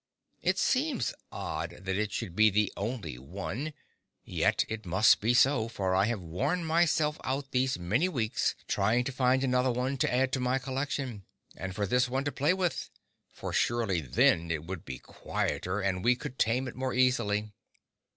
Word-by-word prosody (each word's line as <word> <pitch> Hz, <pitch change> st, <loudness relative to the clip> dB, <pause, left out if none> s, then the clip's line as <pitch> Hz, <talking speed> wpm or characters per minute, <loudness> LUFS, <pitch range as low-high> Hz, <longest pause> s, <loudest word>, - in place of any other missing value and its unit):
It -, -, +1 dB
seems 265 Hz, -, +1 dB, 0.2 s
odd -, -, -4 dB
that 95 Hz, 0 st, -2 dB
it 105 Hz, 0 st, -1 dB
should 95 Hz, -6 st, -4 dB
be 110 Hz, +1 st, +6 dB
the 105 Hz, 0 st, +1 dB
only 100 Hz, -, -4 dB
one, 100 Hz, -, -5 dB, 0.5 s
yet -, -, +1 dB
it 110 Hz, -1 st, -5 dB
must 95 Hz, +3 st, +4 dB
be 115 Hz, +3 st, +2 dB
so, 130 Hz, -3 st, +4 dB
for 95 Hz, -5 st, -1 dB
I 95 Hz, +2 st, +4 dB
have 115 Hz, -1 st, -1 dB
worn 140 Hz, -, -1 dB
myself 160 Hz, -2 st, +2 dB
out 135 Hz, +1 st, -3 dB
these 130 Hz, +1 st, +1 dB
many 110 Hz, -, +1 dB
weeks 115 Hz, -7 st, 0 dB
trying 110 Hz, +5 st, +2 dB
to 140 Hz, -, -3 dB
find 130 Hz, +1 st, +2 dB
another 125 Hz, 0 st, +2 dB
one 125 Hz, +3 st, -1 dB
to -, -, +1 dB
add 130 Hz, +1 st, +2 dB
to 130 Hz, -, 0 dB
my 125 Hz, +1 st, +1 dB
collection, 130 Hz, -5 st, -3 dB, 0.3 s
and 95 Hz, +1 st, -6 dB
for 105 Hz, 0 st, 0 dB
this 125 Hz, +4 st, +2 dB
one 135 Hz, +2 st, -1 dB
to 145 Hz, -, -1 dB
play 145 Hz, +7 st, +2 dB
with; 180 Hz, -3 st, -1 dB, 0.4 s
for -, -, -6 dB
surely 110 Hz, -8 st, +1 dB
then 80 Hz, +5 st, +3 dB
it 80 Hz, -1 st, -2 dB
would 90 Hz, -1 st, -6 dB
be 65 Hz, -1 st, -6 dB
quieter, 90 Hz, +9 st, -3 dB
and 95 Hz, -2 st, -1 dB
we 125 Hz, +2 st, +4 dB
could 130 Hz, 0 st, -8 dB
tame 125 Hz, +4 st, +2 dB
it 120 Hz, -, -7 dB
more 130 Hz, 0 st, -2 dB
easily. 110 Hz, -5 st, +2 dB
120 Hz, 180 wpm, -30 LUFS, 100-130 Hz, 0.5 s, be